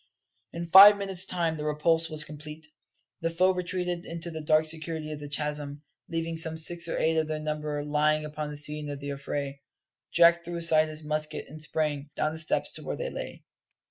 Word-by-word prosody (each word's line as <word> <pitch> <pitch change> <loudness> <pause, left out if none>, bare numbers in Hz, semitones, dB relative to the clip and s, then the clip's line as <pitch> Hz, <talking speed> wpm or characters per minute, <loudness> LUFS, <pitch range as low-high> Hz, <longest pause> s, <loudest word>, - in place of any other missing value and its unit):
In 170 0 -5
five 200 +2 +10
minutes' 195 -2 -2
time 170 -3 -1
the 150 - -5
repulse 160 +2 +1
was 155 -1 0
complete; 150 +1 -10 0.6
the 165 - 0
foe 185 +3 +2
retreated 180 -1 -3
into 170 0 -6
the 160 -1 -6
dark 155 +1 +3
security 155 0 -3
of 150 - -6
the 145 -1 -8
chasm, 145 0 -3 0.3
leaving 165 0 -3
some 160 0 -3
six 170 +1 +2
or - - -2
eight 160 0 +1
of 160 -1 +1
their 155 0 -2
number 150 -1 -3
lying 150 +1 +1
upon 150 0 -5
the 150 - -3
scene 150 0 -1
of 145 -1 -5
the 140 0 -5
affray. 140 0 -5 0.5
Jack 170 0 +5
threw 170 +1 -6
aside 160 -2 +5
his 155 0 -5
musket 155 0 -2
and 155 +2 -11
sprang: 150 -2 -2
down 155 - 0
the 160 - -4
steps 160 - 0
to - - -7
where - - -4
they - - -4
lay. - - -7
155 Hz, 205 wpm, -27 LUFS, 150-165 Hz, 0.6 s, five